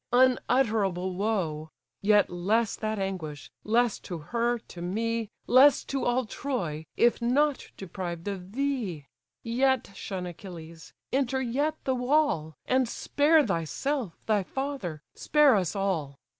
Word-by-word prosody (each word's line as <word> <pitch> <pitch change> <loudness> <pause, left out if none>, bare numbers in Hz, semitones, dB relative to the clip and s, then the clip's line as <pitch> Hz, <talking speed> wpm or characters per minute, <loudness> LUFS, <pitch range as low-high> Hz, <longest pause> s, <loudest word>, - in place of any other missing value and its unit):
unutterable 225 -7 +2
woe! 180 -6 -1 0.3
Yet 205 -1 +4
less 205 +5 +1
that 215 0 -3
anguish, 180 -7 -4
less 235 +1 +2
to 175 - -6 0.2
her, 240 +1 +2
to 180 -6 -12
me, 225 +4 -2 0.2
Less 265 +3 +6
to 275 -1 -3
all 245 +1 +1
Troy, 175 - -4
if 240 +1 +3
not 275 +4 +1
deprived 175 -2 -6
of 190 -1 -5
thee. 240 - -2 0.4
Yet 255 0 +1
shun 190 -2 -5
Achilles! 170 -2 -10 0.2
enter 265 -1 +1
yet 275 +5 0
the 265 - +1
wall; 250 - +1
And 255 -2 +2
spare 300 +4 +3
thyself, 200 - -2
thy 215 -2 +2
father, 220 - -4
spare 300 -5 +4
us 185 -1 0
all! 170 -9 -1
220 Hz, 130 wpm, -28 LUFS, 180-260 Hz, 0.4 s, Less